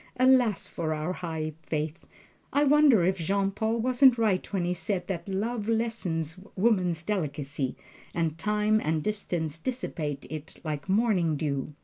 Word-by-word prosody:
Alas 255 -4 +4
for 160 -2 -2
our 155 +4 -2
high 160 -3 -4
faith 155 0 -3 0.5
I 285 - +3
wonder 290 - +6
if 190 +1 +1
Jean 195 +4 +1
Paul 220 +3 -1
wasn't 250 +1 +5
right 210 -5 +1
when 190 -4 0
he 175 - 0
said 180 +1 -2
that 190 0 -4
love 215 +3 -2
lessens 190 -8 -1 0.2
woman's 185 -6 +2
delicacy, 145 -8 -2 0.4
and 165 -2 -1
time 210 +4 +1
and 155 0 0
distance 170 -7 -2
dissipate 160 - -3
it 155 +2 -8
like 155 +2 -4
morning 190 -6 +2
dew?" 145 -1 -2
185 Hz, 145 wpm, -28 LUFS, 160-220 Hz, 0.5 s, wonder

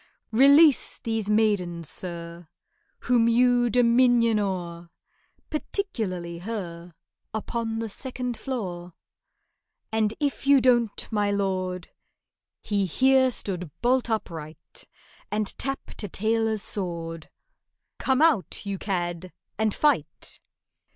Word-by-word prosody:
"Release 280 +5 +5
these 225 -2 -3
maidens, 195 -7 +1
sir, 170 -1 -3 0.5
Whom 240 -2 +3
you 245 +1 +3
dominion 235 -1 +4
o'er— 175 -4 -4 0.6
Particularly 200 - -3
her 175 -5 -6 0.4
Upon 225 +1 -3
the 225 0 -3
second 250 +2 -4
floor. 180 -10 -5 1.0
"And 220 -1 +1
if 285 -2 -2
you 280 -1 +7
don't, 240 -4 +2
my 210 -2 +1
lord"— 185 -3 -2 0.7
He 200 -2 0
here 260 +7 +4
stood 180 -8 -4
bolt 250 0 +2
upright, 165 -8 -6 0.4
And 210 0 -1
tapped 270 +1 -4
a 205 - -5
tailor's 220 +1 0
sword— 165 -4 -4 0.7
"Come 265 +3 +2
out, 285 - +1
you 200 -1 -3
cad, 175 -2 -3 0.3
and 220 -1 +2
fight!" 295 +7 -1
215 Hz, 105 wpm, -25 LUFS, 180-245 Hz, 1.0 s, you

